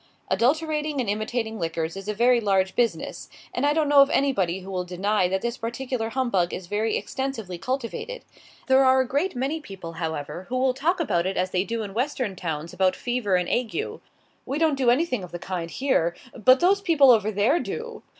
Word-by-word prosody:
Adulterating 300 +2 +1
and 245 - -1
imitating 220 +2 -2
liquors 165 0 -2
is 195 +1 -8
a 210 - -1
very 240 +2 +4
large 190 -2 +1
business; 225 -9 -1 0.2
and 285 - +1
I 290 - +3
don't 310 -1 +1
know 285 -1 +7
of 275 - +5
anybody 190 -12 +1
who 190 +1 -9
will 180 -1 -2
deny 185 +2 0
that 190 +1 -2
this 235 +1 -2
particular 235 0 -3
humbug 225 -8 0
is 185 - -7
very 210 +4 0
extensively 225 -10 -4
cultivated. 260 - -4 0.4
There 265 0 +5
are 260 0 +5
a 260 - -2
great 290 +9 -1
many 275 +6 -1
people, 190 - -8
however, 160 +3 -4
who 255 - -1
will 260 0 +2
talk 330 +8 0
about 180 - +1
it 195 - -3
as 185 0 0
they 185 0 +1
do 230 +1 -3
in 200 -2 -7
Western 250 -3 -1
towns 165 -2 -4
about 185 0 +2
fever 240 -6 -1
and 180 -1 +1
ague: 250 - -2 0.4
"We 275 - -3
don't 320 -1 +3
do 265 -3 +2
anything 250 - +1
of 180 - -9
the 175 - -5
kind 175 -1 -4
here, 175 -9 0 0.2
but 255 +3 +5
those 385 +3 +4
other 400 - -21
people 285 -6 +6
over 215 -3 +3
there 220 - +2
do!" 470 -1 -6
230 Hz, 210 wpm, -25 LUFS, 190-270 Hz, 0.4 s, know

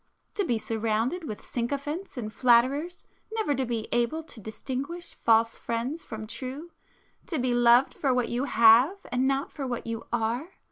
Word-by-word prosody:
To 405 - 0
be 245 -10 +1
surrounded 225 +9 -1
with 215 -7 -7
sycophants 280 +8 -3
and 215 -3 -4
flatterers,—never 290 - +1
to 265 -1 -1
be 230 -2 -2
able 240 +7 0
to 280 - -10
distinguish 265 - -5
false 230 0 +2
friends 240 +8 -3
from 220 -1 -7
true,—to 280 - -8
be 250 -2 +1
loved 240 +2 +5
for 275 - 0
what 250 -2 +1
you 245 +3 -1
have 235 - +6
and 255 +1 +1
not 275 +1 0
for 275 -3 -5
what 240 -2 -4
you 230 -1 -5
are! 240 +8 -1
250 Hz, 155 wpm, -27 LUFS, 230-290 Hz, -, have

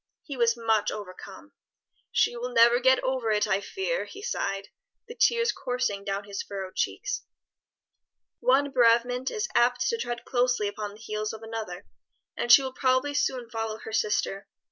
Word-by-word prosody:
He 285 - -7
was 235 -1 +2
much 220 -2 +1
overcome. 200 +6 -9 0.6
"She - - +2
will 245 +1 -4
never 235 0 +6
get 260 +1 +4
over 260 -3 -1
it, 210 -1 +2
I 195 +1 +1
fear," 405 - -2
he 405 - -11
sighed, 195 - -3 0.4
the 470 - -8
tears 470 -1 +3
coursing 250 -6 -2
down 200 0 -3
his 200 -1 -5
furrowed 195 -2 -7
cheeks. - - -2 1.2
"One 285 - +3
bereavement 245 +1 +3
is 440 +1 -2
apt 245 +1 +3
to 465 - -1
tread 240 - -4
closely 245 -4 +1
upon 205 0 -5
the - - -16
heels 215 -1 -3
of 220 0 -9
another, 220 -5 -6 0.5
and 240 - 0
she 270 - +9
will 260 -1 -4
probably 260 +2 +1
soon 255 -4 -1
follow 225 -1 -3
her 220 - -9
sister. 210 -2 0
235 Hz, 165 wpm, -27 LUFS, 210-260 Hz, 1.2 s, she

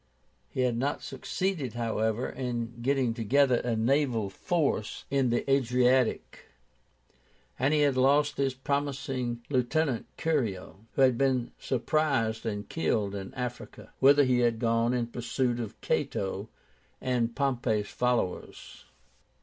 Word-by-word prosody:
He 130 - -2
had 125 -2 +1
not 135 +4 -1
succeeded, 145 - -3
however, 110 0 -1
in 120 -2 -4
getting 130 -2 +1
together 125 +3 +3
a 120 -1 -1
naval 115 -3 +1
force 145 - -1
in 135 -2 +2
the 120 - 0
Adriatic, 125 -2 +2 1.1
and 135 +3 +2
he 155 -1 +3
had 140 -2 +3
lost 140 +3 +3
his 135 -2 0
promising 135 -3 -2
lieutenant, 130 0 0
Curio, 115 - -2
who 135 - +3
had 130 -3 +4
been 130 -3 +1
surprised 125 -5 0
and 105 -1 -3
killed 105 -11 -1
in 95 -2 -6
Africa, 125 -1 -6
whither 140 +2 +6
he 125 -2 +2
had 120 -2 +2
gone 115 +1 +1
in 120 -1 0
pursuit 120 +1 -2
of 115 -3 -6
Cato 100 +2 -2 0.5
and 120 -3 -1
Pompey's 120 -6 0
followers. 125 -7 -2
125 Hz, 125 wpm, -29 LUFS, 115-135 Hz, 1.1 s, whither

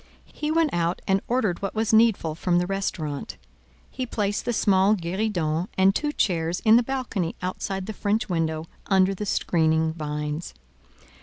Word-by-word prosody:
He 300 - -3
went 320 -1 +2
out 170 +1 0
and 195 0 +2
ordered 220 -8 0
what 195 - -3
was 220 0 0
needful 220 -8 +4
from 175 +2 0
the 175 - +2
restaurant; 175 -7 -3 0.5
he 255 -1 -5
placed 205 -2 -2
the 240 - 0
small 200 -2 +3
guéridon 175 -3 -1
and 190 +1 +5
two 295 +7 -1
chairs 170 - 0
in 220 0 +6
the 240 - +6
balcony 230 -9 -3
outside 190 +1 -3
the 220 - -5
French 210 +2 -1
window 160 -3 -1 0.2
under 190 -1 +3
the 205 +2 -5
screening 160 -3 +1
vines. 150 - -4
190 Hz, 160 wpm, -25 LUFS, 165-215 Hz, 0.5 s, in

